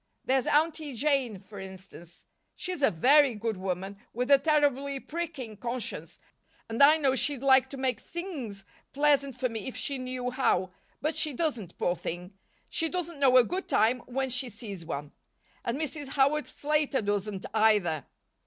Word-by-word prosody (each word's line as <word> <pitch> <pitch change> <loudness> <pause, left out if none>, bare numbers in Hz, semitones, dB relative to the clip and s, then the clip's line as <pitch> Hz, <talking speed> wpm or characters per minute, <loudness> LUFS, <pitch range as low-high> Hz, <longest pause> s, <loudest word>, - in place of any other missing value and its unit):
There's 260 -1 +2
Aunty 305 -2 +1
Jane, 265 -5 +1
for 195 +2 -12
instance. 190 -2 -11 0.3
She's 365 -4 -4
a 275 - +5
very 270 - +5
good 220 +1 -2
woman, 190 +1 -4
with 250 +4 -1
a 280 - +8
terribly 280 -2 +2
pricking 300 -8 -5
conscience, 235 +1 -5 0.5
and 225 +4 -2
I 300 +3 +8
know 275 -4 +2
she'd 275 0 0
like 265 -1 +5
to 275 - -7
make 260 -1 0
things 275 - -6 0.3
pleasant 280 -3 +2
for 255 - +1
me 225 -2 -5
if 260 - -5
she 275 -2 -2
knew 255 -1 -3
how, 190 -8 +1 0.3
but 310 +2 -1
she 305 -3 0
doesn't, 240 - -2
poor 175 - +1
thing. 175 +2 -6 0.3
She 325 - -1
doesn't 340 -3 -3
know 260 -2 +6
a 250 - +8
good 365 - -3
time 230 +4 +3
when 265 +1 -2
she 250 +1 0
sees 205 -5 -7
one. 145 -2 -5 0.5
And 235 +3 -2
Mrs. 295 -1 -3
Howard 280 +2 +2
Slater 295 -4 0
doesn't, 205 -1 -2
either." 210 - +2
255 Hz, 165 wpm, -29 LUFS, 210-290 Hz, 0.5 s, a